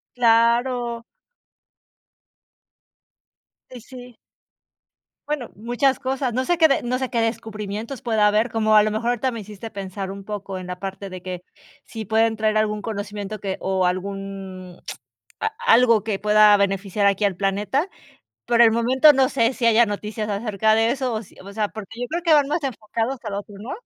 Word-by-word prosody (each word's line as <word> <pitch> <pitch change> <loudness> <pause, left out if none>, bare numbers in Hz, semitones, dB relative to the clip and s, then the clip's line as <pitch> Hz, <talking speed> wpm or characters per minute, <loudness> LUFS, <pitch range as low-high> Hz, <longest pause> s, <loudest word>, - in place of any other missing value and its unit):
Claro. 235 0 +2 2.7
Y 245 -2 -9
sí. 250 -1 -12 1.1
Bueno, 295 -5 -3
muchas 245 +5 0
cosas, 260 -2 -2
no 255 +2 0
sé 350 +4 +1
que 320 -4 +4
no 250 +1 -1
sé 260 -1 -3
que 230 -2 +1
descubrimientos 225 +1 -4
pueda 220 -3 +2
haber, 215 +3 +2
como 215 -1 +2
a 210 - +8
lo 215 - +1
mejor 225 +3 -2
ahorita 245 +2 0
me 230 -2 -6
hiciste 210 +2 -9
pensar 195 -1 -6
un 195 0 -8
poco 200 -2 -6
en 185 - -7
la 180 0 -6
parte 195 0 -6
de 185 -1 -8
que 180 -1 -6 0.4
si 220 -2 -7
pueden 225 +1 +2
traer 215 0 +1
algún 210 -1 0
conocimiento 205 0 -5
que 195 -2 -4
o 190 -1 0
algún 190 -1 -5 0.6
a 440 - -1 0.2
algo 230 -3 +5
que 215 -3 -2
pueda 210 0 +6
beneficiar 200 +1 0
aquí 200 +1 +2
al 195 -3 0
planeta. 205 - -1 0.6
Por 235 0 +3
el 225 -1 +7
momento, 255 +6 +5
no 265 -1 +3
sé, 235 -1 +1
si 240 - -2
haya 230 +1 +5
noticias 210 +1 -4
acerca 215 +1 +1
de 225 +1 +2
eso, 260 -3 -2
o 220 +1 -3
sí - - -19
o 200 - -10
sea, 210 0 0
porque 220 +2 -9
yo 245 - -2
creo 340 +2 -3
que 330 -3 +4
van 290 -2 +4
más 310 +1 -1
enfocados 230 +1 -3
al 210 - -4
otro, 205 0 -7
¿no? 230 +5 -7
220 Hz, 180 wpm, -22 LUFS, 200-240 Hz, 2.7 s, a